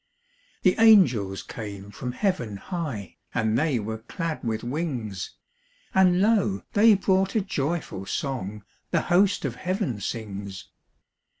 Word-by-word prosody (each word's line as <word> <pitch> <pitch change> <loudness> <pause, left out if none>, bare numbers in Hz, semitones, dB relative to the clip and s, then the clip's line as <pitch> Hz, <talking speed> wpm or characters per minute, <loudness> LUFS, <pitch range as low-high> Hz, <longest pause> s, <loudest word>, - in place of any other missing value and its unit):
The 185 - +5
angels 130 - +5
came 100 -2 -7
from 125 +3 -5
heaven 130 - -1
high, 140 - -5 0.2
And 110 0 +1
they 145 +1 +2
were 110 0 -4
clad 165 - -4
with 110 -1 -2
wings; 120 - -3 0.6
And 185 -1 +5
lo, 205 -2 +2
they 215 +1 +7
brought 190 +1 +1
a 220 - +3
joyful 150 - -3
song 105 -8 -3 0.3
The - - +2
host 190 -2 +4
of 125 -3 -3
heaven 185 - -2
sings. 100 -3 -5
135 Hz, 125 wpm, -26 LUFS, -, 0.6 s, they